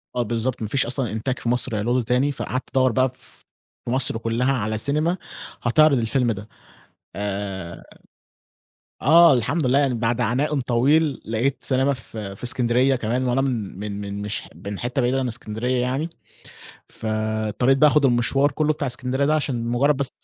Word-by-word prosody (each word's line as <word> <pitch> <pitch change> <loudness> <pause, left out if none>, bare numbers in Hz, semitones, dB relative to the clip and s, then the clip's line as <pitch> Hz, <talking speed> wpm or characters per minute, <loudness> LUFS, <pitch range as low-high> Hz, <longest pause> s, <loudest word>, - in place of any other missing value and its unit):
آه 120 - +1
بالضبط، 115 +2 -2
ما 110 - -2
فيش 130 +3 +1
أصلًا 120 -3 -1
إنتاج 125 +4 -3
في 120 - -3
مصر 125 -1 +1
هيعرضه 120 +4 +1
تاني، 125 +5 +1
فقعدت 130 -1 -4
أدوّر 130 -1 +4
بقى 130 +3 +2
ف - - -9 0.4
في 120 - -3
مصر 130 -3 +4
كلّها 115 +4 0
على 110 -3 -2
سينما 155 - 0 0.4
هتعرض 140 +3 +4
الفيلم 120 +1 +1
ده، 105 +1 -7 0.7
آآ 95 -3 -5 1.2
آه 165 +2 +7
الحمد 130 +5 0
لله 135 +3 +3
يعني 135 -3 +1
بعد 115 +1 -1
عناءٌ 135 +6 0
طويل 135 +5 +2
لقيت 115 +5 -1
سينما 135 +1 +1
ف 115 -2 -9
في 100 +1 -7
إسكندرية 125 +2 +2
كمان، 120 +2 -1
وأنا 125 +2 +1
من 115 -8 -3
من 105 -1 -5
من 100 0 -5
مش 105 +1 -3 0.2
من 100 -1 -5
حِتّة 125 +2 -1
بعيدة 125 +2 +1
عن 130 - -1
إسكندرية 120 +2 -2
يعني، 135 +6 -1 0.8
فاضطريت 110 +3 0
بقى 150 +1 +6
آخد 145 +1 +3
المشوار 135 +3 +2
كلّه 155 +2 +1
بتاع 145 -2 -3
إسكندرية 125 +3 -1
ده 155 +2 +2
عشان 125 -6 -1
مجرد 135 +4 +2
بس 135 -2 0
125 Hz, 170 wpm, -22 LUFS, 110-135 Hz, 1.2 s, آه